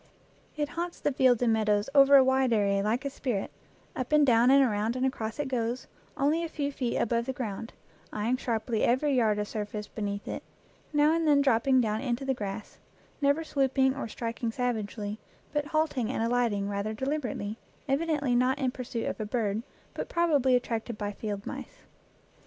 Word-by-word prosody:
It 295 -1 -1
haunts 345 +2 -4
the 290 - 0
fields 255 -3 +3
and 230 -2 +3
meadows 210 -1 +1
over 280 0 +7
a 270 - +9
wide 260 -1 +2
area 200 -2 +2
like 225 +6 -1
a - - 0
spirit, 245 -8 -3 0.4
up 255 +1 -4
and 300 -1 +5
down 240 -1 +5
and 275 +1 +7
around 220 -1 0
and 255 +1 0
across 225 -4 -3
it 295 -2 -2
goes, 245 -1 -2 0.3
only 300 +5 +2
a 335 - -3
few 285 -2 -2
feet 250 -4 -2
above 235 +1 0
the 265 - -1
ground, 225 -3 -5 0.4
eyeing 220 +4 0
sharply 230 -2 -1
every 270 +4 +2
yard 220 -5 +3
of 210 0 -2
surface 210 -1 -5
be 220 - -8
neath 200 0 -3
it, - - -4 0.5
now 300 +1 +4
and 330 -1 +1
then 290 -2 +5
dropping 260 0 +3
down 215 -1 -1
into 250 0 -2
the 270 - +1
grass, 205 -2 -6 0.4
never 285 +3 +2
swooping 270 -3 +1
or 275 - -4
striking 230 +1 -3
savagely, 220 -3 -3 0.3
but 295 0 0
halting 300 -6 0
and 250 - -1
alighting 230 -4 +1
rather 205 +2 -2
deliberately, 250 -5 -3 0.3
evidently 285 -2 +1
not 255 +3 +2
in 265 -3 0
pursuit 250 -3 -4
of - - -3
a 215 - -2
bird, 215 -2 -1 0.3
but - - -5
probably 290 -7 +3
attracted 235 -2 -2
by 205 -1 -3
field 205 -1 -5
mice. - - -8
245 Hz, 185 wpm, -28 LUFS, 220-275 Hz, 0.5 s, a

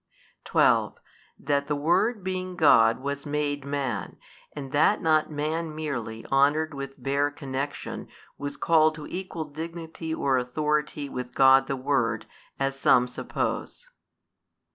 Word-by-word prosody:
12. - - +3 0.4
That 140 0 0
the 150 - 0
Word 175 +9 +1
being 185 -1 -3
God 115 -8 +5
was 140 0 -3
made 145 -1 -1
Man, 135 -8 -3 0.3
and 135 -3 -7
that 155 +8 +3
not 155 -2 +2
man 155 +1 -3
merely 120 -8 -4
honoured 145 +3 +3
with 135 -1 -7
bare 140 +1 +1
connection 140 0 -5 0.3
was 145 0 -5
called 155 -1 +4
to 155 -1 -8
equal 180 -2 -5
Dignity 160 +2 -7
or 135 -4 +1
Authority 150 +3 -1
with 125 -2 -6
God 135 0 +6
the 135 - -1
Word, 125 -5 0 0.3
as 135 0 -1
some 125 -2 +4
suppose. - - -4
145 Hz, 130 wpm, -26 LUFS, 135-155 Hz, 0.4 s, God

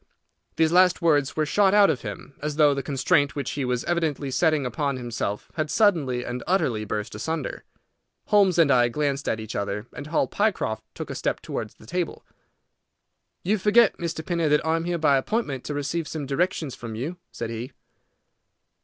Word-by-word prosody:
These 160 -1 +3
last 180 0 +5
words 145 -5 +3
were 155 - +1
shot 200 +5 +3
out 205 -1 +6
of 125 - -4
him, 110 +5 -8
as 150 0 -3
though 150 -2 +5
the 140 - -2
constraint 145 +2 +1
which 140 -3 -3
he 145 - -2
was 125 -1 -1
evidently 155 -5 -1
setting 155 -1 +2
upon 140 +1 -1
himself 115 -4 -4
had 155 -1 -2
suddenly 150 - +2
and 125 0 -4
utterly 125 - +1
burst 105 +2 -4
asunder. 160 -4 -4 0.6
Holmes 200 -4 +4
and 160 -4 +5
I 120 -2 +5
glanced 140 +1 -1
at 110 - -1
each 110 0 -7
other, 100 +1 -2
and 145 - -7
Hall 155 - +1
Pycroft 190 - -1
took - - -6
a - - -3
step - - -2
towards - - -5
the - - -17
table. 180 +8 -3 1.2
"You 205 +4 +1
forget, 210 +3 +5
Mr. 165 -2 -4
Pinner, 170 -3 0
that 150 +1 +2
I 160 0 +2
am 165 0 -2
here 175 0 -1
by 145 -4 +4
appointment 140 - -2
to 150 - -3
receive 155 +3 -2
some 155 -3 -4
directions 155 0 -1
from 115 -2 -7
you," 150 +11 -4
said 115 -1 -5
he. 115 +3 -5
150 Hz, 190 wpm, -25 LUFS, 125-170 Hz, 1.2 s, out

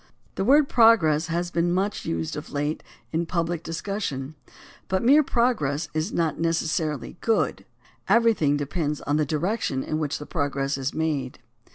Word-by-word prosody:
The - - -2
word 280 +6 +5
"progress" 175 - +4
has 175 +1 -2
been 170 0 +1
much 195 +3 -1
used 80 -1 -2
of 150 - -7
late 145 +2 -2 0.3
in 165 +1 -1
public 170 -1 -1
discussion, 165 -5 -4 0.5
but 190 +2 0
mere 280 +6 +6
progress 235 - 0
is 155 0 -1
not 165 -2 -1
necessarily 165 -1 -1
good. 225 -1 0 0.4
Everything 220 -12 +3
depends 150 +1 -2
on 145 +1 0
the 155 -1 +1
direc 175 +10 -1
tion 130 -1 -1
in 155 - -2
which 150 -2 -2
the 150 - -8
progress 140 -3 -1
is 135 +1 -2
made. 150 -5 -2
160 Hz, 160 wpm, -25 LUFS, 145-190 Hz, 0.5 s, mere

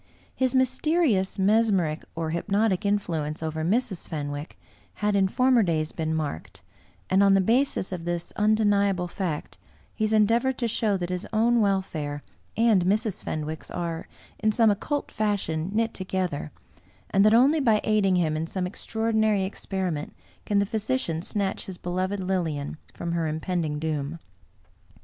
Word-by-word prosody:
His 260 0 +1
mysterious 260 - +2
mesmeric 195 -6 +2
or 165 -1 -2
hypnotic 200 +3 +1
influence 160 -7 -1
over 160 0 -2
Mrs. 205 +1 0
Fenwick 145 -1 -5 0.4
had 210 -1 0
in 195 -1 +4
former 255 +3 +3
days 160 -5 0
been 160 -1 -2
marked; 150 - -5 0.4
and 190 +1 +3
on 195 -1 +6
the - - +5
basis 230 0 +1
of 180 -3 -4
this 175 0 -3
undeniable 205 -3 +2
fact, 175 -4 -4 0.3
he 220 - -3
has 215 - +1
endeavored 230 +5 +3
to 240 - 0
show 210 -2 +1
that 175 -1 -4
his 180 +1 -3
own 230 +1 +3
welfare 160 -8 -1 0.3
and 220 -5 +4
Mrs. 210 +1 0
Fen 155 -1 -3
wick's 155 +1 -6
are, 170 -2 -4 0.3
in 215 0 +2
some 220 0 +4
occult 285 +8 -2
fashion, 190 -6 -1
knit 225 +2 0
together, 185 -5 -3 0.6
and 195 - +4
that 215 +1 +6
only 275 +7 +5
by 225 -6 +3
aiding 205 -3 +2
him 160 -3 +1
in 160 +1 -2
some 185 +1 -2
extraordinary 220 +1 0
experiment 190 -5 -3 0.3
can 205 - +2
the 200 - +3
physician 215 -5 -2
snatch 195 +1 -2
his 190 -2 -7
beloved 185 +3 -2
Lilian 170 -6 -2
from 170 - -5
her 170 -1 0
impending 160 -1 -2
doom. 155 0 -3
190 Hz, 155 wpm, -26 LUFS, 165-215 Hz, 0.6 s, on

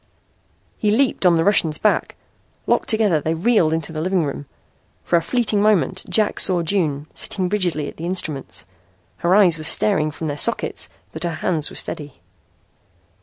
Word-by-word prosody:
He 210 - +1
leaped 225 -3 +2
on 170 -2 +4
the 165 - +2
Russian's 165 -5 +2
back. 210 - 0 0.5
Locked - - 0
together 210 -8 +2
they 160 +3 -1
reeled 175 -2 +2
into 160 0 -3
the 155 -1 -4
living 180 -1 0
room. 140 0 -6 0.6
For - - 0
a 170 - +3
fleeting 215 +2 0
moment 205 -10 +1
Jack 215 -2 +1
saw 180 -3 +4
June 155 -5 -1
sitting 185 -2 -1
rigidly 175 -7 -1
at - - -10
the 165 - -6
instruments. 155 - -4 0.5
Her 175 +2 +2
eyes 180 -6 +4
were - - -7
starting 155 -1 +3
from 155 +2 -7
their 145 -1 -3
sockets - - 0 0.2
but 160 - -6
her 170 -2 -2
hands 155 -1 -2
were - - -12
steady. 145 -3 -5
170 Hz, 170 wpm, -20 LUFS, 155-200 Hz, 0.6 s, on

